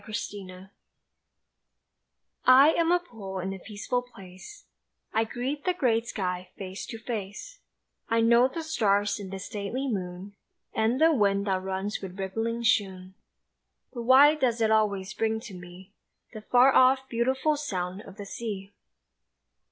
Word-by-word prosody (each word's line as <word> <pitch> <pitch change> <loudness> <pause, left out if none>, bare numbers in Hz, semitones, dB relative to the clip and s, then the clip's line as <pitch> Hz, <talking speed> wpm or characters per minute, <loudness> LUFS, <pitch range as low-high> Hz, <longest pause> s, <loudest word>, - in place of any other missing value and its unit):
THE 215 - -9
SEA 205 -2 -5
WIND 185 +1 -12 1.8
I 265 +4 +8
AM 335 +1 +1
a 355 - +5
pool 220 - -8
in 190 +1 -3
a 190 - -8
peaceful 215 +6 -3
place, 195 - -13 0.5
I 225 +1 +2
greet 260 +6 -4
the 365 -1 0
great 235 -7 +1
sky 180 -3 -3
face 190 0 -7
to 225 - -7
face, 225 - -6 0.5
I 230 - +2
know 235 +2 +5
the 325 +5 -6
stars 205 -10 +1
and 195 -2 -8
the 195 - -5
stately 210 +6 -4
moon 190 -3 -5 0.4
And 225 +4 +1
the 325 +1 +5
wind 200 -5 +2
that 190 -2 0
runs 190 +2 -3
with 190 -1 -8
rippling 225 +5 -3
shoon 190 -4 0 0.8
But 240 - -5
why 265 +5 +7
does 255 -6 0
it 220 -1 +2
always 210 -2 +1
bring 220 0 -1
to 230 -4 -10
me 180 +2 -12 0.4
The 215 - -8
far 250 +4 +4
off, 265 +1 +4
beautiful 260 +6 +1
sound 190 -9 -4
of 195 -1 -13
the 205 - -7
sea? 200 -2 -6
220 Hz, 155 wpm, -27 LUFS, 195-250 Hz, 1.8 s, I